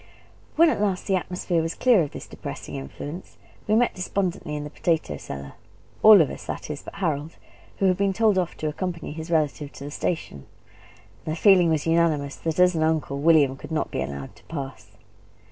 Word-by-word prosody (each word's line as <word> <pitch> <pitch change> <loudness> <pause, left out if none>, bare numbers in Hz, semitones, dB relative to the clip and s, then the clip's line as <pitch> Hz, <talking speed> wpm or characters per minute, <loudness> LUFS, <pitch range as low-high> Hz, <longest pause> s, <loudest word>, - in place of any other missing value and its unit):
When 330 0 +6
at - - -2
last 195 -3 0
the 195 - +1
atmosphere 180 -1 -1
was 165 0 -3
clear 245 -7 +4
of 150 - -1
this - - -9
depressing - - -8
influence, 145 - -7 0.3
we 215 - +3
met 240 +2 +3
despondently 180 -4 -2
in 150 - -4
the 150 - -7
potato 155 - -1
cellar 70 0 -8 0.5
all 215 -4 +9
of 150 - +1
us, - - -9
that - - -5
is, 145 - -6
but - - -11
Harold, 160 -5 -2 0.4
who 195 - +1
had 185 -1 +3
been 200 0 +2
told 210 -1 +3
off 175 -2 -3
to 155 - -3
accompany 170 +2 -4
his 160 +2 -7
relative 150 -3 0
to - - -10
the 145 - -6
station; 145 - -3 0.8
and 155 - -3
the 160 - -6
feeling 185 -5 +6
was 155 -2 0
unanimous, 165 -4 +1
that, 165 +1 -3
at 180 0 +6
an 160 - -1
uncle, 155 -3 0
William 145 -3 +4
could 140 - -11
not 160 - -1
be - - -2
allowed 70 0 -6
to - - -20
pass. 140 -4 -7
165 Hz, 205 wpm, -25 LUFS, 145-185 Hz, 0.8 s, all